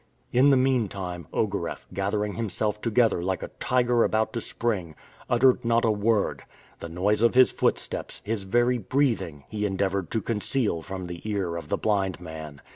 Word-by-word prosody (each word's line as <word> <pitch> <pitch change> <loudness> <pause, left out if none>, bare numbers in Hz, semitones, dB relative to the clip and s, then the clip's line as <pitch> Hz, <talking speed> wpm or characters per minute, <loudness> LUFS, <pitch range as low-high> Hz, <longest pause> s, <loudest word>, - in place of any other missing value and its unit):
In 130 +4 +5
the 135 - +5
mean 130 -4 +2
time, 90 -5 -6
Ogareff, - - -2
gathering 100 +2 -1
himself 105 -1 -2
together 115 -5 +2
like 95 +1 -2
a - - -5
tiger 120 -1 +2
about 110 0 +1
to 115 - -2
spring, 95 -12 -2 0.3
uttered 125 +1 +4
not 115 0 +2
a 110 - +4
word. 105 0 +1 0.4
The 85 - -7
noise 100 +5 +1
of 115 +1 +4
his 130 0 +7
footsteps, - - -2
his 110 0 -1
very 120 +5 +2
breathing, 105 - 0
he 105 +7 -4
endeavored 95 -2 -1
to 110 - -1
conceal 110 -4 0
from 95 +2 -6
the 85 -1 -7
ear 95 -5 -1
of 85 -3 -6
the - - +1
blind 95 -4 0
man. 80 -4 -8
105 Hz, 175 wpm, -26 LUFS, 95-115 Hz, 0.4 s, his